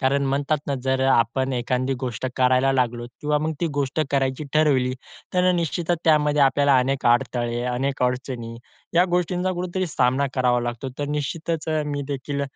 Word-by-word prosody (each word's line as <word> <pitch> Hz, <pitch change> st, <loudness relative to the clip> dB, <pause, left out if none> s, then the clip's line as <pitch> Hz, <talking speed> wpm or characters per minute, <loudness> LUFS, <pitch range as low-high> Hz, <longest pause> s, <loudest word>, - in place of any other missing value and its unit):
कारण 140 Hz, +1 st, +2 dB
म्हणतात 140 Hz, +3 st, 0 dB
ना, 140 Hz, -, 0 dB
जर 130 Hz, 0 st, +1 dB
आपण 130 Hz, +1 st, +2 dB
एखादी 125 Hz, +2 st, -1 dB
गोष्ट 125 Hz, -1 st, -3 dB
करायला 130 Hz, +1 st, +3 dB
लागलो 120 Hz, -2 st, 0 dB, 0.2 s
किंवा 150 Hz, 0 st, +1 dB
मग 155 Hz, +2 st, -1 dB
ती 170 Hz, -, +1 dB
गोष्ट 140 Hz, +1 st, -1 dB
करायची 135 Hz, +1 st, 0 dB
ठरवली, 140 Hz, -5 st, +3 dB, 0.4 s
तर 180 Hz, 0 st, +3 dB
अ, -, -, +4 dB
निश्चितच 170 Hz, 0 st, -1 dB
त्यामध्ये 150 Hz, -2 st, +3 dB
आपल्याला 140 Hz, 0 st, +4 dB
अनेक 135 Hz, +1 st, -1 dB
अडथळे, 120 Hz, 0 st, +1 dB
अनेक 135 Hz, +2 st, -2 dB
अडचणी, 125 Hz, -2 st, -2 dB, 0.4 s
या 175 Hz, +1 st, +5 dB
गोष्टींचा 180 Hz, +1 st, 0 dB
कुठेतरी 180 Hz, +1 st, -2 dB
सामना 130 Hz, -1 st, +1 dB
करावा 125 Hz, -2 st, +2 dB
लागतो. 120 Hz, +2 st, -4 dB
तर 145 Hz, -, -1 dB
निश्चितच 155 Hz, +3 st, -3 dB
अ, 155 Hz, -1 st, +1 dB
मी 145 Hz, -1 st, -3 dB
देखील 140 Hz, 0 st, -3 dB
135 Hz, 165 wpm, -23 LUFS, 125-150 Hz, 0.4 s, या